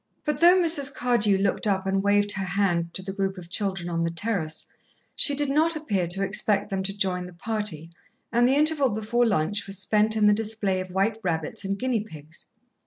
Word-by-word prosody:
But 300 -1 -1
though 345 +3 +7
Mrs. 320 -6 +3
Cardew 235 -6 +1
looked 195 +2 0
up 190 -2 0
and 195 0 0
waved 205 +1 +2
her 190 -1 -3
hand 180 -3 0
to 185 - -1
the 190 0 -6
group 195 -1 -2
of 175 -1 -11
children 190 -3 -1
on 165 -1 -1
the 165 - 0
terrace, 170 -3 -2 0.4
she 285 - +3
did 290 +1 +1
not 315 +4 +2
appear 205 - -1
to 195 +3 +1
expect 200 +1 +1
them 195 -1 -1
to 195 +1 -4
join 180 -2 -1
the 180 - -12
party, 175 -4 -3 0.4
and 240 +1 +3
the 265 - +2
interval 300 -2 +2
before 225 +3 0
lunch 200 0 0
was 195 0 -4
spent 210 +3 +1
in 210 - +3
the 210 - +6
display 210 -3 -2
of 185 0 -6
white 200 +4 0
rabbits 160 +1 -3
and 195 0 -2
guinea 250 -1 -1
pigs. 160 -6 -11
200 Hz, 210 wpm, -25 LUFS, 185-225 Hz, 0.4 s, though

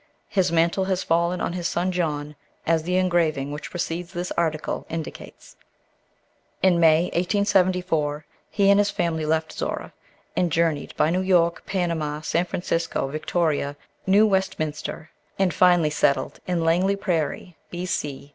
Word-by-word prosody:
His 185 -3 +1
mantle 170 +3 +2
has 190 -1 -1
fallen 170 +2 +1
on - - -1
his 175 -1 -2
son 180 +2 -1
John, 150 -4 -2 0.3
as 165 0 +2
the 180 +3 -2
engraving 170 -6 +1
which 150 +1 -6
precedes 175 0 -4
this 175 +1 -4
article 155 -2 -2
indicates. 165 -1 -8 1.1
In 180 -2 +4
May, 165 +1 +4
1874, 180 -5 +1 0.2
he 200 -1 +3
and 200 - +5
his 205 0 +3
family 160 -4 -1
left 160 0 0
Zorra - - -4 0.4
and 175 -2 +1
journeyed 160 -2 0
by 155 - +3
New 180 +2 +1
York, 175 -3 +2
Panama, 165 -5 -1
San 170 +3 0
Francisco, 165 -5 -2
Victoria, 155 -1 -1 0.3
New 200 +3 +6
Westminster, 160 -6 -2 0.3
and 190 -3 +2
finally 175 -3 +4
settled 140 -2 +1
in 175 -2 0
Langley 180 +4 +3
Prairie, 175 -3 -2
B.C. 150 -6 -4
170 Hz, 140 wpm, -24 LUFS, 155-180 Hz, 1.1 s, New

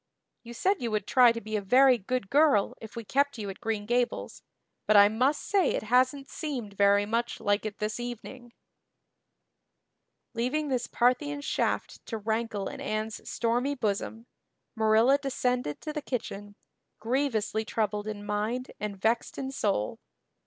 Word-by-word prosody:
You 235 0 -10
said 380 +6 +1
you 235 - -1
would 215 -2 -1
try 245 0 +6
to 230 - -4
be 215 0 -5
a 210 - 0
very 255 +5 +5
good 210 0 -3
girl 285 -7 +4
if 220 0 -10
we 230 - -5
kept 280 +4 +1
you 205 -3 -4
at 190 - -12
Green 220 -2 -2
Gables, 240 +2 -1 0.5
but 215 - +6
I 205 0 +8
must 255 +7 +1
say 390 -6 +2
it - - -2
hasn't 255 +4 +2
seemed 255 -10 -5
very 200 0 +4
much 230 +3 -1
like 205 +1 0
it 210 - -7
this 215 +1 -3
evening." 240 +1 -7 1.8
Leaving 260 +6 -1
this 245 -2 -1
Parthian 255 +5 +1
shaft - - -2
to 225 - -3
rankle 220 -1 -2
in - - -7
Anne's 215 0 -4
stormy 240 +5 0
bosom, 225 0 -2 0.5
Marilla 225 +5 +4
descended 250 - -1
to 305 - -5
the 300 - -3
kitchen, 205 -6 -5 0.4
grievously 225 -3 0
troubled 210 -1 -2
in 205 -1 -5
mind 215 +5 -2
and 205 -2 -4
vexed 225 +4 0
in 270 -1 -4
soul. 200 - -1
230 Hz, 160 wpm, -28 LUFS, 210-255 Hz, 1.8 s, I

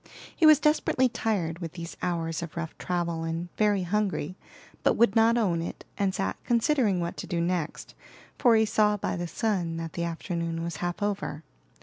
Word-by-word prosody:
He 320 - +5
was 305 -2 +8
desperately 300 -4 +2
tired 200 -8 -1
with 165 -2 -6
these 170 -1 -7
hours 165 -2 -1
of 170 0 -7
rough 165 -1 -4
travel, 170 -2 -2
and 165 +2 -3
very 205 -3 +2
hungry; 185 -3 -1 0.5
but - - +3
would 230 -3 +4
not 225 +1 +5
own 180 -8 +1
it, 170 - -6
and 195 -2 0
sat 95 0 -1
considering 235 -5 +2
what 170 0 -3
to - - -6
do 170 - -1
next, 170 -2 -2 0.5
for 240 -4 +5
he 220 0 +4
saw 210 -1 +3
by 195 - -2
the 175 -1 -3
sun 175 -3 -1
that 165 -1 -5
the 170 - -2
afternoon 170 0 -3
was 170 0 -4
half 175 +3 -3
over. 195 -7 -2
175 Hz, 190 wpm, -27 LUFS, 170-215 Hz, 0.5 s, was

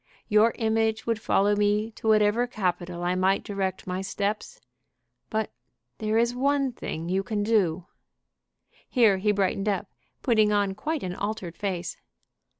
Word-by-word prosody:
Your 215 +2 +4
image 220 -1 +1
would 230 -1 -1
follow 205 -1 +3
me 210 +2 +1
to 220 - -7
whatever 215 +2 +4
capital 180 -5 -2
I 175 +1 +1
might 190 +2 +2
direct 195 -2 -3
my 185 0 -3
steps. 200 +2 -3 0.7
But 220 -1 -1 0.5
there 215 0 0
is 235 +1 +2
one 275 +1 +1
thing 165 -8 -5
you 190 +2 +1
can 205 0 -2
do." 190 -6 +1 1.0
Here 225 -7 +4
he 210 +2 +2
brightened 195 0 0
up, 200 0 -2 0.3
putting 220 -4 +4
on 205 -2 +2
quite 300 +9 -3
an 180 -1 -3
altered 200 -3 -4
face. 180 -4 -3
210 Hz, 150 wpm, -26 LUFS, 190-220 Hz, 1.0 s, Your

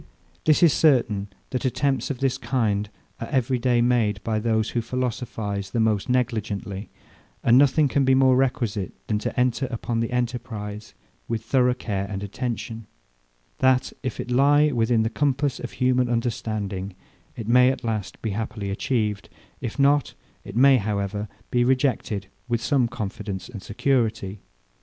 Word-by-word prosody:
This 155 +3 +4
is 165 - +6
certain, 115 -9 +3 0.2
that 130 - -2
attempts 135 +1 0
of 135 -2 -4
this 135 -1 +1
kind 105 -5 0 0.3
are 115 - -4
every 130 -2 0
day 120 -1 +2
made 120 -4 +2
even 100 - -15
by 110 -1 0
those 110 0 0
who 120 - 0
philosophize 115 -5 -3
the 115 - -2
most 110 0 +1
negligently: 110 -5 -1 0.5
And 120 - +5
nothing 145 +3 +5
can 140 +1 +1
be 130 0 +4
more 130 -1 +5
requisite 125 -7 0
than 105 -1 0
to 110 - -3
enter 125 +1 +1
upon 120 -1 -3
the 115 - -1
enterprize 115 - -4 0.3
with 115 -2 -2
thorough 125 0 +2
care 100 -5 -3
and 100 -1 -4
attention; 115 0 -4 0.7
that, 130 -1 +3
if 130 - -4
it 125 - -4
lie 145 +4 +4
within 115 -2 +2
the 110 - 0
compass 140 0 0
of 125 - -6
human 125 -1 +2
understanding, 105 -5 -2 0.4
it 115 -3 -6
may 125 +2 +6
at 130 - -3
last 110 -3 -3
be 110 - -1
happily 105 -1 -3
achieved; 105 -1 -1 0.3
if 115 - -5
not, 140 0 +3 0.3
it - - -9
may, 135 +2 +6
however, 105 -1 -2 0.2
be 120 0 +3
rejected 125 -6 0 0.2
with 120 -2 0
some 125 +1 +2
confidence 100 -3 -5
and 110 -5 -8
security. 110 -3 0
120 Hz, 160 wpm, -24 LUFS, 105-130 Hz, 0.7 s, is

